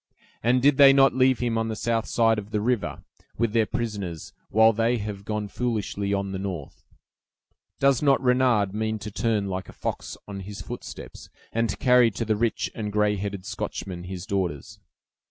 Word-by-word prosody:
And 125 +2 +2
did 140 -1 +5
they 140 -1 +9
not 135 0 +5
leave 130 0 +3
him 115 -2 0
on 115 - -1
the 110 - -3
south 115 0 -1
side 115 -2 +3
of 105 0 -9
the 105 - -1
river, 120 0 -1 0.3
with 115 -1 0
their 115 -2 +3
prisoners, 100 -8 -4 0.2
while 110 +1 +5
they 115 +3 +1
have 100 -2 -6
gone 105 -1 -2
foolishly 105 -3 -2
on 100 -1 -1
the 95 - -4
north? 90 -7 -6 0.9
Does 135 -2 +3
not 140 -2 +4
Renard 125 -6 +2
mean 110 +1 -1
to 105 0 -7
turn 105 0 0
like 95 -1 -4
a - - -10
fox - - -5
on 100 -1 -6
his 100 +1 -8
footsteps, - - -9 0.2
and 115 0 +1
to - - -3
carry 125 -2 +5
to 115 +2 -4
the 110 0 +1
rich 115 +1 -1
and 105 -2 -4
gray 105 0 +2
headed 100 -1 -5
Scotchman 100 -3 -5
his 90 -1 -6
daughters? 95 0 -3
110 Hz, 190 wpm, -25 LUFS, 100-120 Hz, 0.9 s, they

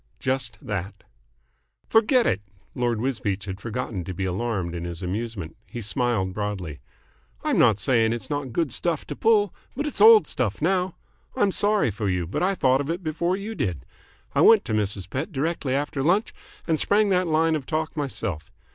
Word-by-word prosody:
"Just 130 -3 -1
that." 100 -1 -5 0.8
"Forget 230 +3 +4
it!" 100 - +1 0.3
Lord 120 -2 0
Wisbeach 110 -6 -2
had 95 0 -6
forgotten 115 -4 -4
to 95 - -5
be 95 - -2
alarmed 95 -2 -2
in 85 -1 -4
his 85 +1 -5
amusement. 95 -3 -4
He 120 - -7
smiled 110 -4 0
broadly. 95 -7 -4 0.6
"I'm - - +1
not 110 -5 +5
saying 115 +1 +2
it's 120 0 -3
not 145 -4 -3
good 160 +1 0
stuff 165 +4 -1
to - - -6
pull, 210 -4 +3 0.2
but 290 +3 -2
it's 295 - -3
old 445 0 +9
stuff - - -2
now. 185 -2 +1 0.4
I'm 200 - +2
sorry 205 - +2
for 105 0 -2
you, 90 -2 0
but 85 - -3
I 195 +2 +2
thought 130 -4 +3
of 145 - -5
it 175 +3 -3
before 170 +4 0
you 210 +3 -5
did. 90 - -3 0.5
I - - +3
went 225 -3 +7
to 115 - -3
Mrs. 100 -3 -1
Pett 130 - -4
directly 145 -2 -1
after 145 0 -2
lunch 185 - +2 0.3
and 160 -2 +1
sprang 205 0 +3
that 185 -2 +2
line 160 0 +2
of 140 -4 -4
talk 160 0 -2
myself. 115 - -3
125 Hz, 185 wpm, -25 LUFS, -, 0.8 s, old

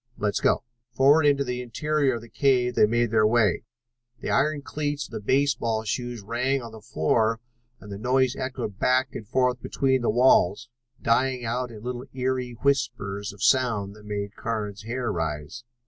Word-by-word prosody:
Let's 105 -1 0
go." - - +2 0.3
Forward 140 +5 +4
into 140 -1 +3
the 125 -1 -3
interior 140 +2 0
of 115 - -6
the - - -11
cave 125 -1 +2
they 105 - +5
made 120 0 +1
their 110 -1 +4
way. 110 -3 +2 0.5
The - - -3
iron 150 -1 +1
cleats 145 -1 -3
of - - -14
the - - -4
baseball 115 -2 +1
shoes 120 +1 -3
rang 125 +6 0
on 115 -3 -8
the 110 -1 -11
floor 110 +6 +1 0.4
and 105 - -12
the 100 - -6
noise 130 +2 +2
echoed 115 -6 -5
back 130 0 +2
and 105 - -7
forth 125 +1 +1
between 130 +1 +1
the 120 - 0
walls, 120 -2 +3 0.3
dying 125 +1 +1
out 125 +2 -2
in 110 -2 -11
little 125 +1 -5
eerie 125 -2 -2
whispers 100 -7 0
of 100 - -8
sound 115 -7 +2
that 105 0 -15
made 105 0 -4
Carnes' 105 -2 -4
hair 120 +1 -2
rise. 80 +6 -4
120 Hz, 180 wpm, -25 LUFS, 105-130 Hz, 0.5 s, they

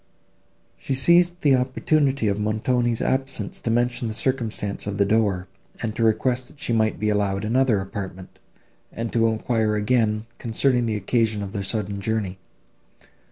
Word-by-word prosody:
She 135 - -2
seized 175 +5 +4
the 140 -3 +5
opportunity 135 0 +1
of 100 0 0
Montoni's 115 +3 0
absence 130 -6 -1
to - - -2
mention 120 +1 +1
the 110 - -3
circumstance 110 -6 -2
of 100 -1 -3
the 100 - +3
door, 100 -4 +1 0.3
to 115 0 -2
request 125 +3 +1
that 145 - -16
she 120 - -1
might 110 -1 +1
be 105 - 0
allowed 100 -1 0
another 120 -1 +2
apartment, 95 -1 -7 0.5
and 115 0 -5
to 115 -1 +3
enquire 110 -1 0
again, 110 0 +1
concerning 120 +1 +1
the 110 - -1
occasion 110 +1 0
of 100 - -6
their 100 - -2
sudden 100 0 -3
journey. 100 -3 -2
110 Hz, 155 wpm, -23 LUFS, 105-125 Hz, 0.5 s, the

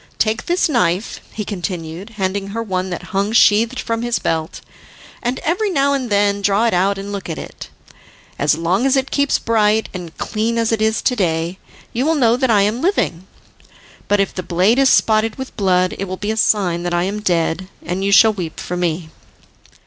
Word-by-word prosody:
Take 220 0 0
this 350 +2 +2
knife," 225 - 0
he 210 - -5
continued, 180 +1 -5
handing 195 0 -2
her 225 +3 -4
one 185 -3 -2
that 175 - -6
hung 200 +2 0
sheathed 230 +3 +4
from 230 0 -2
his 240 -1 0
belt, 160 -1 -2 0.6
"and 245 +2 -1
every 380 +6 0
now 280 -5 +2
and 260 -3 -2
then 200 0 +2
draw 200 +3 +2
it 230 - +1
out 195 +3 +2
and 200 +1 -6
look 200 -3 -5
at 160 - -4
it. - - -9 0.7
As 150 +1 +3
long 180 +9 +1
as 270 - +3
it 265 0 -1
keeps 280 -1 +2
bright 220 -1 +1
and 175 -3 -8
clean 225 +2 -1
as 230 -1 +1
it 225 -1 0
is 220 0 +1
to 250 - +2
day, 170 -2 -1 0.3
you 240 - 0
will 325 - +2
know 240 -5 +3
that 260 0 0
I 205 -3 +4
am 215 +5 0
living; 190 - 0 0.8
but 205 0 +2
if 195 - 0
the 185 - -4
blade 185 +8 +2
is 270 -1 +5
spotted 220 0 +3
with 265 -1 -8
blood, 185 -3 +2
it 195 - -2
will 185 0 -5
be 205 +2 -2
a - - -2
sign 190 -6 +2
that 175 0 -2
I 175 - +1
am 205 +3 -3
dead, 175 -1 0 0.2
and 180 +3 -2
you 200 - +1
shall 215 +3 +6
weep 175 -6 -6
for 180 - -4
me." 170 -2 -2
205 Hz, 210 wpm, -18 LUFS, 180-230 Hz, 0.8 s, shall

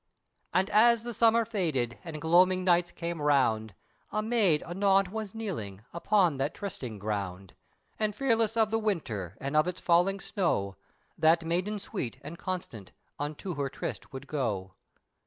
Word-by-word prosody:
And 185 +2 +2
as 230 +1 +5
the 240 0 -4
summer 230 0 +4
faded, 155 - -1
and 160 -3 -6
gloaming 180 +4 +4
nights 175 -1 +3
came 170 -2 -4
round, 115 -8 +2 0.4
A 215 - -1
maid 215 -9 +3
anon 195 +2 +2
was 220 -1 -5
kneeling, 110 - -5
upon 175 -3 +2
that 135 +3 -1
trysting 130 - -6
ground, 100 -2 -4 0.5
And 215 -2 0
fearless 230 -3 +1
of 220 -1 +3
the 225 - +2
winter, 115 - -2
and 140 +2 -3
of 155 +3 +4
its 180 0 -3
falling 180 +3 +3
snow, 100 - -1 0.4
That 165 +1 +4
maiden 180 +6 -1
sweet, 135 - -5
and 155 +4 -8
constant, 165 - -5 0.3
unto 150 +5 -4
her 140 -3 -2
tryst - - -6
would 135 0 -7
go. 105 -11 -2
170 Hz, 155 wpm, -29 LUFS, 135-205 Hz, 0.5 s, as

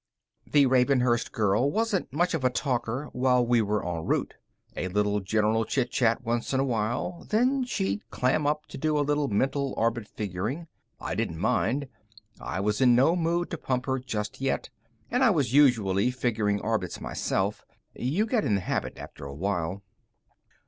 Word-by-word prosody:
The 145 -2 +6
Ravenhurst 125 -2 +2
girl 105 +5 +2
wasn't 220 -1 -1
much 175 +6 +1
of 160 -5 -1
a 130 - +4
talker 130 +1 -2
while 125 -1 +3
we 120 -1 +3
were 105 -2 -1
en 85 -2 -3
route. - - -1 0.4
A 90 - -2
little 105 +2 +1
general 110 +3 +1
chitchat 120 0 +1
once 120 +2 -1
in - - +2
a - - +3
while, 120 +7 -2
then 255 +5 +2
she'd 100 - -2
clam 135 +4 +1
up 150 +1 0
to - - -8
do 155 +1 +1
a 145 - +2
little 145 0 +1
mental 135 +5 0
orbit 115 -1 0
figuring. 105 - -4 0.3
I - - -4
didn't 80 - -2
mind. 115 - 0 0.5
I 90 - -4
was 105 +4 0
in 125 -2 +6
no 135 +8 +4
mood 170 0 0
to 170 - -4
pump 125 -1 -1
her 130 -1 0
just 110 -2 -4
yet, 135 -1 -1 0.4
and 250 - +2
I 255 - +6
was 145 - +1
usually 115 -7 +4
figuring 110 -5 0
orbits 110 -5 -2
myself. 100 +2 -2 0.3
You 155 - 0
get 225 -2 +1
in 105 - +2
the 100 - 0
habit - - -3
after - - -9
a 70 0 -7
while. 95 +2 -2
125 Hz, 175 wpm, -27 LUFS, 105-145 Hz, 0.5 s, The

